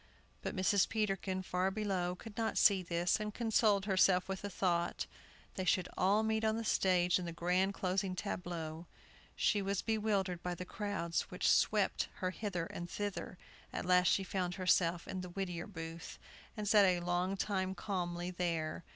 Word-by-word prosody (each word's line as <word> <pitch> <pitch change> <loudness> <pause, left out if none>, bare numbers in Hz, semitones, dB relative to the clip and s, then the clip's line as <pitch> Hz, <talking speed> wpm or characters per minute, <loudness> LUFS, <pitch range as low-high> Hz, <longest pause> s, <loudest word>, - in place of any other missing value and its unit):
But - - -4
Mrs. 190 +1 +3
Peterkin, 195 -3 -1
far 185 +1 0
below, 190 -3 -1
could 215 +3 -11
not 225 0 -1
see 195 -2 +5
this, 175 +2 0
and 210 0 -3
consoled 215 -3 +2
herself 185 -2 +3
with 190 0 -4
the 205 - -4
thought, 175 -3 0 0.5
they 185 - -3
should 185 0 +2
all 200 +4 +3
meet 220 0 0
on 220 0 +2
the 230 - -3
stage 180 -3 +3
in 180 - -4
the 170 - -4
grand 180 +3 +1
closing 185 0 -1
tableau. 175 -4 -4 0.5
She 205 - +2
was 195 -1 -1
bewildered 205 -5 0
by 180 0 -3
the 180 - -6
crowds 180 -5 -2
which - - -1
swept - - +3
her 185 -1 -2
hither 185 -4 -3
and 175 +1 -7
thither. 205 -2 -4 0.3
At - - -4
last 180 0 +4
she 195 - +3
found 180 -2 -2
herself 175 -2 +2
in 185 - -4
the 180 - -7
Whittier 175 -2 -4
Booth, 165 -3 -7 0.4
and 210 -1 -3
sat 205 0 +6
a 180 -2 +2
long 175 +2 0
time 190 -1 -1
calmly 175 -2 -3
there. 170 -3 -2
185 Hz, 175 wpm, -35 LUFS, 175-200 Hz, 0.5 s, sat